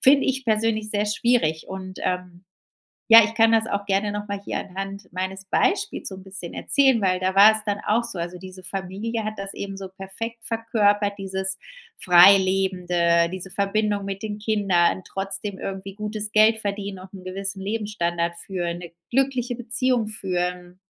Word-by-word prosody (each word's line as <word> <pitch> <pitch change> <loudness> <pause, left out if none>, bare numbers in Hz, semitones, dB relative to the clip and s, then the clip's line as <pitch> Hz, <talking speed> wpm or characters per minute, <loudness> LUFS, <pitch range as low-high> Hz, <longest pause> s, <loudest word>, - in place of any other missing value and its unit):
Finde 275 +1 +6
ich 265 0 -1
persönlich 220 -1 0
sehr 210 0 0
schwierig. 210 -8 +1
Und, 185 0 -7
ähm 180 0 -3 0.7
ja 225 -1 +11
ich 220 - -5
kann 225 0 +5
das 225 0 +3
auch 200 0 -2
gerne 200 +1 +1
noch 205 0 -5
mal 200 - -3
hier - - -2
anhand 195 +1 -7
meines 190 +1 -4
Beispiels 390 - 0
so 190 - -4
'n 190 - -12
bisschen 190 -3 -7
erzählen 265 -5 +3
weil 185 -2 +1
da 185 +1 -1
war 205 +2 +9
es 215 - +1
dann 205 0 -1
auch 225 +3 +2
so. 230 -6 -3
Also, 175 +1 -4
diese 185 0 -11
Familie 195 +5 -4
hat 215 - -3
das 195 0 -5
eben 195 -1 -6
so 195 -1 -7
perfekt 195 +5 -6
verkörpert 210 -3 +1
dieses 190 0 -2 0.4
Freilebende 180 -2 +4
diese 185 +1 -6
Verbindung 200 +1 0
mit 195 +1 -5
den 210 -1 -4
Kindern 195 -5 +1
trotzdem 195 +1 -3
irgendwie 195 0 -6
gutes 210 0 -4
Geld 220 +1 +5
verdienen 200 -2 -4
und 185 +1 -13
'n 185 -2 -11
gewissen 195 +1 -4
Lebensstandard 175 -5 -2
führen, 175 -3 -3
'ne 170 -1 -10 0.2
glückliche 255 -2 0
Beziehung 245 -1 +1
führen 180 -3 -3
195 Hz, 170 wpm, -23 LUFS, 185-215 Hz, 0.7 s, ja